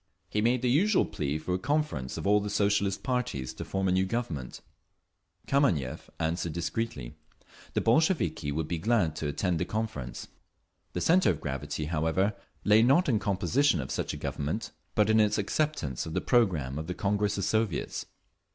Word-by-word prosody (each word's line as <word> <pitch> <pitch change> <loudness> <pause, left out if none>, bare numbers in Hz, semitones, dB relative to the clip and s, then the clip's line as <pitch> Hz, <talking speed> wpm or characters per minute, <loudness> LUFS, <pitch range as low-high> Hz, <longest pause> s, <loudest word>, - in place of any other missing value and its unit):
He 105 - +1
made 120 +2 +2
the 125 - +3
usual 190 - +4
plea 75 0 -2
for 85 +4 -3
a 90 - 0
conference 145 - -1
of - - -5
all 105 +1 +5
the 105 0 -3
Socialist 100 -1 +1
parties 125 - -2
to - - -6
form 95 0 -1
a - - +2
new 95 +1 +2
Government…. 85 - -4 0.8
Kameniev 105 - +1
answered 85 0 -1
discreetly. 85 - -3 0.6
The - - +2
Bolsheviki 125 - +2
would 75 +1 -2
be 85 - -2
very - - -12
glad 105 -9 +2
to 75 - -2
attend 85 +3 0
the - - 0
conference. 105 - -4 0.7
The 90 - -2
centre 180 - +4
of - - 0
gravity, 75 +2 -4
however, 80 +6 +1 0.3
lay 105 +1 +6
not 135 +10 +4
in 115 -6 +2
composition 105 - +2
of 65 - -4
such - - -2
a - - -5
Government, 75 +10 -3 0.2
but 105 -2 +4
in 110 0 +4
its 105 0 +3
acceptance 105 - -1
of 80 - -6
the - - +2
programme 80 - +2
of 80 - -5
the 90 - -3
Congress 105 +1 0
of 100 - -1
Soviets. 110 -4 -1
100 Hz, 180 wpm, -29 LUFS, 80-115 Hz, 0.8 s, lay